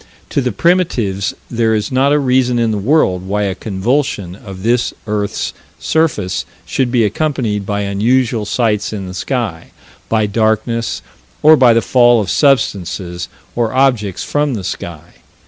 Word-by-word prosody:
To 140 - +1
the 125 -1 -1
primitives 120 - 0 0.2
there 115 -2 +1
is 105 +6 -2
not 135 +2 +3
a 150 - +4
reason 130 -3 +2
in 115 -1 +1
the 105 - -1
world 100 - +2
why 105 +1 0
a 100 -2 0
convulsion 100 -1 -2
of 95 -2 -10
this 120 +2 +1
earth's 105 -2 -2 0.2
surface 150 - 0 0.2
should 130 -3 -1
be 120 -2 +3
accompanied 110 -4 -1
by 100 0 -1
unusual 110 +3 +1
sights 105 -2 0
in 100 -3 -4
the 90 - -7
sky, 105 -5 -3 0.4
by 110 -1 +2
darkness, 110 +2 0 0.4
or 155 +1 +8
by 125 -5 +5
the 115 -1 +2
fall 120 +1 +4
of 100 -4 -2
substances 95 - 0 0.3
or 115 -1 0
objects 125 -8 +1
from 145 -3 0
the 100 - -5
sky. 85 -3 -7
110 Hz, 155 wpm, -16 LUFS, 100-130 Hz, 0.4 s, or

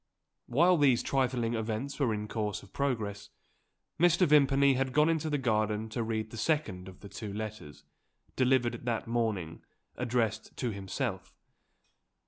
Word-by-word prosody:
While 170 +8 +4
these 135 -5 +4
trifling 125 -3 0
events 115 +5 -3
were 130 -5 +2
in 105 0 -3
course 105 -1 -3
of 95 - -17
progress, 105 -7 -2 0.7
Mr. 175 +2 +5
Vimpany 140 -2 +5
had 130 0 -1
gone 150 +3 +4
into 160 -1 0
the 145 - +1
garden 110 -3 0
to 115 +2 -3
read 110 -1 -2
the 115 - -8
second 110 - -1
of 95 -1 -12
the 100 - -9
two 105 +1 -7
letters, 105 -8 -7 0.5
delivered 125 -2 +2
that 115 -2 -1
morning, 110 -8 -2 0.3
addressed 110 -2 -1
to 125 -3 -1
himself. 100 0 -4
115 Hz, 145 wpm, -30 LUFS, 105-135 Hz, 0.7 s, Mr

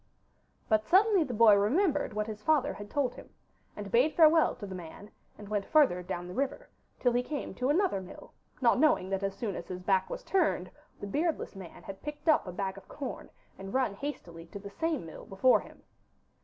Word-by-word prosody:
But 215 -1 +3
suddenly 385 - +4
the 270 - -5
boy 220 -1 +7
remembered 290 - +2
what 210 0 -1
his 215 -1 -7
father 290 +1 +2
had 205 0 -9
told 265 -2 0
him, - - -13 0.5
and 205 -1 -7
bade 255 +7 +3
farewell 320 -1 +5
to 210 - -8
the 190 - -7
man, 185 +4 -10 0.3
and 210 - -10
went 205 -1 -1
further 275 - +4
down 175 0 -5
the 180 - -7
river, 275 +3 -3 0.3
till 245 -2 +2
he 245 - +2
came 285 +3 -5
to 255 +1 -1
another 330 - +2
mill, 185 - -12 0.3
not 240 0 +4
knowing 285 -11 +3
that 195 0 -1
as 195 -1 -2
soon 210 -6 -3
as 170 - -7
his 180 0 -6
back 190 0 +2
was - - -6
turned 385 -1 0 0.3
the - - -6
beardless 305 - -2
man 185 -3 -11
had 195 0 -9
picked 295 +1 -8
up 310 -10 +4
a - - -4
bag 190 +1 -4
of 190 - -23
corn 285 - -7 0.3
and 195 +3 -7
run 260 -6 +1
hastily 175 - -7
to 185 - -9
the 200 0 -9
same 320 - -2
mill 160 - -10
before 195 +7 +4
him. - - -14
215 Hz, 210 wpm, -30 LUFS, 195-295 Hz, 0.5 s, boy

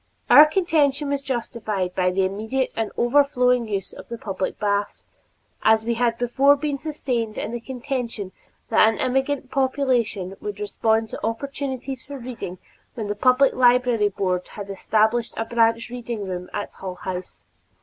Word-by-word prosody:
Our 300 +1 +10
contention 305 -5 +1
was 280 -1 -1
justified 220 -8 -3
by 180 -1 +2
the 190 +1 +1
immediate 220 +7 -2
and 225 -2 -2
overflowing 250 -2 +3
use 200 -3 -3
of - - -12
the 235 - -5
public 195 -4 -3
baths, 205 0 -1 0.6
as 220 0 +4
we 235 - +1
had 235 0 +1
before 265 +4 +4
been 285 -1 -3
sustained 250 -8 -3
in - - -3
the 240 - -3
contention 240 -5 -4 0.4
that 220 -1 +6
an 225 - -3
immigrant 265 +1 0
population 255 -8 0
would 205 -1 -5
respond 220 +2 0
to - - -8
opportunities 265 +2 -4
for 280 0 -8
reading 235 -7 -7 0.4
when 220 -4 -4
the 205 - -1
Public 255 +4 +4
Library 245 -4 +4
Board 185 -2 -1
had 200 -1 -8
established 220 +4 +1
a 225 - -1
branch 230 0 +1
reading 235 -4 -5
room 180 -1 -5
at - - -4
Hull 185 -1 -7
House. 180 - -6
235 Hz, 160 wpm, -23 LUFS, 205-265 Hz, 0.6 s, Our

